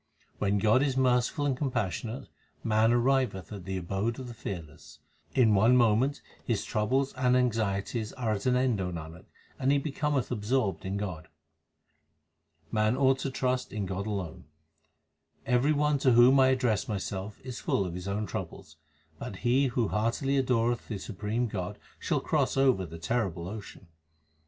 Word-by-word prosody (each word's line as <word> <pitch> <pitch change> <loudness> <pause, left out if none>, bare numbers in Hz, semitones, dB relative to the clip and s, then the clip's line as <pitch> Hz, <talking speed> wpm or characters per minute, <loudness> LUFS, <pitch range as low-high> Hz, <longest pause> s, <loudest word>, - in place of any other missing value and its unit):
When 100 0 +1
God 110 +5 +4
is 135 -2 0
merciful 130 +3 +2
and 140 -2 +1
compassionate, 125 -2 -3 0.4
man 110 0 +3
arriveth 120 -5 +1
at 95 -4 -8
the 95 0 -3
abode 95 +6 -2
of 130 - -7
the 120 - -7
Fearless. 85 -8 -8 0.4
In 115 -5 +5
one 110 +5 +5
moment 120 +4 +2 0.2
his - - -1
troubles 130 +6 0
and 125 0 +2
anxieties 110 -2 -1
are 120 -4 -2
at 100 +2 -2
an 125 - +3
end, 125 -5 +1
O 90 -1 -2
Nanak, 85 +1 -8 0.3
and 135 +1 +2
he 140 - +4
becometh 140 -2 -1
absorbed 110 -2 -1
in 95 +1 -2
God. 90 -6 -5 1.4
Man 110 +3 +2
ought 135 -1 +3
to 135 - -2
trust 130 -1 -1
to 105 - -6
God 95 +1 -3
alone: 95 -9 -4 1.0
Every 125 +5 +3
one 150 -1 +2
to 130 -2 +4
whom 125 +3 +7
I 130 - +6
address 125 -5 +1
myself 100 -1 -4
is 125 -5 -6
full 100 - 0
of 90 - -5
his 90 +2 -6
own 105 +2 -1
troubles; 80 -3 -7 0.4
But - - -6
he 130 +3 +4
who 120 -3 0
heartily 115 +6 0
adoreth 120 -3 +1
the 105 - -4
Supreme 105 +4 -2
God 95 -5 -4 0.2
shall - - 0
cross - - 0
over 130 -9 +3
the 80 - -9
terrible 90 -2 -2
ocean. 100 -1 -9
115 Hz, 165 wpm, -29 LUFS, 100-130 Hz, 1.4 s, whom